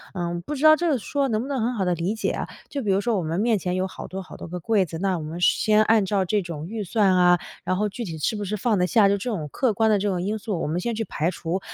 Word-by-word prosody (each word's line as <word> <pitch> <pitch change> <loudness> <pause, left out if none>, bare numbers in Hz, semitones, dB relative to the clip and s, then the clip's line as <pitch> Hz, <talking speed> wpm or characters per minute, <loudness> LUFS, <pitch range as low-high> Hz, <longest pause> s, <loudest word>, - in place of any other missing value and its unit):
嗯， 175 -1 -2
不 240 - -6
知 280 - -5
道 310 0 +9
这 345 +2 -1
个 285 - +2
说 280 +5 -1
能 220 -3 0
不 255 - -5
能 280 -2 -2
很 240 +3 0
好 210 -5 -1
地 180 - +2
理 170 +5 -1
解 220 - -1
啊。 - - -4 0.2
就 280 - -3
比 205 - +1
如 190 - +3
说 230 -1 0
我 180 - -1
们 165 +3 -2
面 225 0 +2
前 180 0 -2
有 185 +1 0
好 - - -9
多 190 +1 -6
好 - - -12
多 - - -8
个 180 +2 -5
柜 200 +2 +2
子， 165 -1 -7
那 190 -1 0
我 - - -6
们 160 +3 -6
先 215 +3 +4
按 220 -2 +3
照 195 0 +1
这 205 +3 +1
种 165 -3 -6
预 215 +2 -4
算 195 -1 +2
啊， 175 -1 +5 0.2
然 185 - 0
后 210 +1 0
具 235 +4 -6
体 165 -4 -6
是 185 - 0
不 210 - -4
是 205 +2 -2
放 215 +1 +1
得 180 - +3
下， 215 -1 +5
就 200 - +2
这 205 +6 -4
种 160 -8 -3
客 255 -5 +1
观 220 +2 +2
的 210 - +4
这 205 - -1
种 180 -2 -1
因 210 +4 -1
素， 205 -5 -3
我 - - -1
们 160 +4 -1
先 235 - -2
去 225 - -1
排 160 -2 -1
除， 170 +2 -3
200 Hz, 355 characters per minute, -24 LUFS, 180-220 Hz, 0.2 s, 道